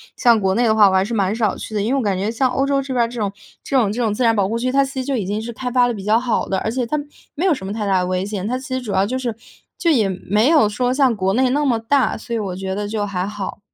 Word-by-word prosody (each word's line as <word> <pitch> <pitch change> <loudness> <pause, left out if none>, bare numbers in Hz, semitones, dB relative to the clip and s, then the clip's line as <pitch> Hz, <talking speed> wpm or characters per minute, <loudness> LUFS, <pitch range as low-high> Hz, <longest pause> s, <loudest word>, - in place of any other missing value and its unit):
像 235 -3 +4
国 190 -1 +1
内 240 - +2
的 225 -2 +3
话 215 -2 +6
我 - - -1
还 190 - +4
是 220 +4 -4
蛮 200 -1 +1
少 220 -4 0
去 215 - -7
的， 205 - +1
因 225 +6 0
为 - - +2
我 - - +1
感 200 -5 0
觉 200 +4 -1
像 255 +3 +1
欧 270 +2 0
洲 275 0 +1
这 270 -1 -5
边 245 -2 +2
儿 - - -3
这 240 0 -7
种 205 -2 -1 0.3
这 275 - 0
种 220 -6 +2
这 235 +4 -3
种 220 -3 +1
自 250 - -1
然 230 -1 +4
保 200 -3 +2
护 225 +3 -2
区， 255 +2 -1
它 275 +1 +3
其 270 - -8
实 - - -4
就 275 0 -1
已 210 - -2
经 205 +3 -2
是 235 +2 -5
开 250 +2 -4
发 245 0 +3
得 240 - -1
比 200 -3 -7
较 215 +2 +4
好 240 0 -1
的， 195 - 0
而 220 - -2
且 250 +1 -1
它 300 - -1 0.4
没 325 +5 -1
有 370 - +4
什 190 -9 -6
么 200 - -4
太 215 -1 -3
大 195 -2 +2
的 180 - -1
危 185 +1 -1
险。 205 -1 -4
它 250 +3 -1
其 260 0 -7
实 260 - -1
主 215 -5 -5
要 190 - +2
就 255 +5 -2
是 240 -4 -3 0.4
就 335 - +2
也 230 -9 +3
没 205 +5 0
有 305 -10 +4
说 245 +4 0
像 265 -2 +3
国 190 -1 0
内 255 +3 +2
那 290 +3 +1
么 245 -4 +2
大， 260 +4 +1
所 235 +2 -5
以 - - -1
我 195 -4 -4
觉 190 0 -4
得 205 0 -3
就 210 0 -2
还 185 -2 -2
好。 205 -2 -6
225 Hz, 375 characters per minute, -20 LUFS, 200-255 Hz, 0.4 s, 话